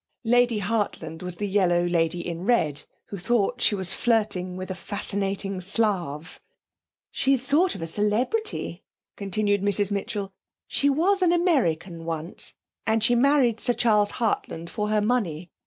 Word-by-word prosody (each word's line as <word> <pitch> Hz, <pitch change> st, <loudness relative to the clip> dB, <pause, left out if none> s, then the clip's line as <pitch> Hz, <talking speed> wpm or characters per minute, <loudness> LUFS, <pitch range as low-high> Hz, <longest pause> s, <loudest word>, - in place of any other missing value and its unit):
Lady 245 Hz, 0 st, +3 dB
Hartland 205 Hz, -6 st, -2 dB
was 180 Hz, -1 st, -4 dB
the 205 Hz, +3 st, -3 dB
yellow 180 Hz, -3 st, +2 dB
lady 175 Hz, 0 st, 0 dB
in 170 Hz, 0 st, -5 dB
red, 160 Hz, -, +1 dB, 0.2 s
who 200 Hz, -, -6 dB
thought 240 Hz, +4 st, 0 dB
she 210 Hz, -, +3 dB
was 190 Hz, -1 st, -2 dB
flirting 205 Hz, -6 st, 0 dB
with 185 Hz, +1 st, -5 dB
a -, -, -1 dB
fascinating 195 Hz, 0 st, -3 dB
Slav. 180 Hz, -6 st, -2 dB, 0.7 s
'She's 270 Hz, -2 st, +1 dB
a -, -, -12 dB
sort 325 Hz, +7 st, +2 dB
of 165 Hz, -, -5 dB
celebrity,' 215 Hz, -, -1 dB, 0.3 s
continued 205 Hz, 0 st, 0 dB
Mrs 205 Hz, 0 st, +2 dB
Mitchell. 200 Hz, -1 st, -3 dB, 0.3 s
'She 285 Hz, -, +2 dB
was 365 Hz, +8 st, +2 dB
an 355 Hz, -2 st, +4 dB
American 190 Hz, -, +1 dB
once, 165 Hz, +1 st, -3 dB, 0.3 s
and 220 Hz, 0 st, +2 dB
she 245 Hz, -, +4 dB
married 250 Hz, -2 st, +3 dB
Sir 245 Hz, -, +2 dB
Charles 210 Hz, -4 st, +3 dB
Hartland 170 Hz, -7 st, -2 dB
for 210 Hz, -1 st, -2 dB
her 215 Hz, 0 st, +2 dB
money. 190 Hz, -8 st, -1 dB
205 Hz, 150 wpm, -25 LUFS, 180-240 Hz, 0.7 s, an